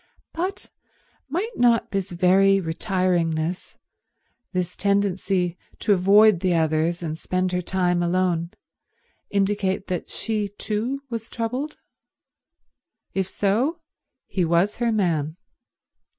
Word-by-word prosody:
But 365 Hz, +4 st, -3 dB, 0.6 s
might 390 Hz, -, -2 dB
not 240 Hz, -1 st, +3 dB
this 195 Hz, -1 st, -2 dB
very 190 Hz, +2 st, +4 dB
retiringness, 175 Hz, -2 st, -1 dB, 0.8 s
this 180 Hz, -2 st, -2 dB
tendency 195 Hz, -3 st, 0 dB, 0.2 s
to 210 Hz, -, +2 dB
avoid 200 Hz, +1 st, +5 dB
the 180 Hz, -1 st, +1 dB
others 160 Hz, +2 st, +1 dB
and 160 Hz, -1 st, -4 dB
spend 185 Hz, 0 st, -1 dB
her 180 Hz, 0 st, 0 dB
time 180 Hz, -1 st, +1 dB
alone, 175 Hz, -1 st, +1 dB, 0.8 s
indicate 200 Hz, -1 st, 0 dB
that 180 Hz, -2 st, -3 dB
she 215 Hz, -2 st, -2 dB
too 240 Hz, +6 st, -2 dB
was 230 Hz, -1 st, -4 dB
troubled? 250 Hz, +6 st, -3 dB, 1.4 s
If 190 Hz, -1 st, 0 dB
so, 225 Hz, -, 0 dB, 0.5 s
he 190 Hz, -2 st, -1 dB
was 170 Hz, +5 st, +2 dB
her 235 Hz, -1 st, +1 dB
man. 165 Hz, -7 st, 0 dB
190 Hz, 105 wpm, -24 LUFS, 175-215 Hz, 1.4 s, avoid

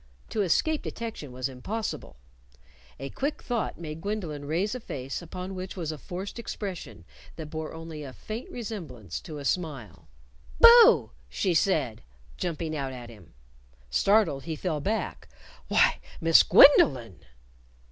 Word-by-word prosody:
To 215 Hz, -, -1 dB
escape 295 Hz, -, +1 dB
detection 225 Hz, -, -6 dB
was 130 Hz, +1 st, -3 dB
impossible. 195 Hz, -, -5 dB, 0.8 s
A 135 Hz, +1 st, -6 dB
quick 290 Hz, +3 st, -3 dB
thought 240 Hz, -3 st, -2 dB
made 155 Hz, -1 st, -7 dB
Gwendolyn 175 Hz, -8 st, -4 dB
raise 175 Hz, +9 st, -1 dB
a 255 Hz, -, -4 dB
face 135 Hz, -, -5 dB
upon 180 Hz, +3 st, -7 dB
which 185 Hz, +1 st, -6 dB
was 165 Hz, -3 st, -3 dB
a 155 Hz, -, -6 dB
forced 190 Hz, +8 st, -6 dB
expression 170 Hz, -, -6 dB, 0.3 s
that 155 Hz, -2 st, -8 dB
bore 160 Hz, -1 st, -5 dB
only 160 Hz, -1 st, -8 dB
a 140 Hz, -3 st, -7 dB
faint 215 Hz, -, -7 dB
resemblance 160 Hz, -, -6 dB
to 155 Hz, -3 st, -8 dB
a 140 Hz, -, -7 dB
smile. 140 Hz, -, -3 dB, 0.5 s
"Boo!" 470 Hz, 0 st, +8 dB, 0.2 s
she 185 Hz, -3 st, 0 dB
said, 150 Hz, -, +1 dB, 0.3 s
jumping 165 Hz, -2 st, -3 dB
out 135 Hz, -3 st, -3 dB
at 120 Hz, -2 st, -9 dB
him. 105 Hz, -, -17 dB, 0.6 s
Startled, 190 Hz, -, +2 dB
he 160 Hz, -, -3 dB
fell 155 Hz, -1 st, -2 dB
back. 215 Hz, +7 st, -3 dB, 0.4 s
"Why, -, -, +3 dB, 0.2 s
Miss 165 Hz, 0 st, +7 dB
Gwendolyn!" 135 Hz, -, +6 dB
165 Hz, 140 wpm, -27 LUFS, 140-205 Hz, 0.8 s, Boo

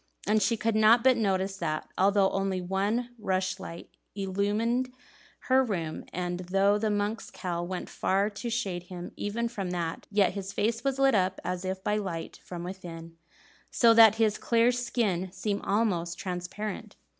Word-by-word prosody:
And 215 Hz, +1 st, +3 dB
she 230 Hz, +3 st, +2 dB
could 225 Hz, +1 st, 0 dB
not 220 Hz, +2 st, +6 dB
but 260 Hz, -1 st, +6 dB
notice 195 Hz, -3 st, 0 dB
that, 155 Hz, -4 st, -2 dB
although 195 Hz, 0 st, +3 dB
only 195 Hz, -1 st, -1 dB
one 200 Hz, +7 st, -1 dB
rushlight 185 Hz, -4 st, -3 dB, 0.3 s
illumined 205 Hz, +6 st, 0 dB, 0.5 s
her 265 Hz, 0 st, +3 dB
room, 170 Hz, -9 st, -3 dB
and 180 Hz, 0 st, -3 dB
though 195 Hz, +3 st, +2 dB
the 220 Hz, 0 st, 0 dB
monk's 205 Hz, +2 st, -1 dB
cowl 175 Hz, -2 st, -4 dB
went 185 Hz, 0 st, -4 dB
far 195 Hz, +2 st, +1 dB
to 220 Hz, +4 st, -5 dB
shade 195 Hz, -7 st, -2 dB
him 180 Hz, -1 st, -7 dB
even 230 Hz, +3 st, -2 dB
from 200 Hz, -6 st, -4 dB
that, 170 Hz, -2 st, -3 dB
yet 200 Hz, -3 st, +3 dB
his 200 Hz, 0 st, -5 dB
face 225 Hz, +2 st, 0 dB
was 275 Hz, -1 st, 0 dB
lit 270 Hz, -1 st, +4 dB
up 190 Hz, -2 st, +1 dB
as 180 Hz, 0 st, -3 dB
if 190 Hz, 0 st, -4 dB
by 210 Hz, -, +1 dB
light 185 Hz, -6 st, -5 dB
from 175 Hz, -1 st, -7 dB
within, 170 Hz, -3 st, -8 dB, 0.5 s
so 230 Hz, -2 st, +5 dB
that 225 Hz, -2 st, +8 dB
his 220 Hz, -2 st, +1 dB
clear 235 Hz, +1 st, +3 dB
skin 225 Hz, -7 st, -1 dB
seemed 200 Hz, +2 st, -2 dB
almost 190 Hz, -5 st, 0 dB
transparent. 185 Hz, +3 st, -5 dB
200 Hz, 165 wpm, -28 LUFS, 185-225 Hz, 0.5 s, that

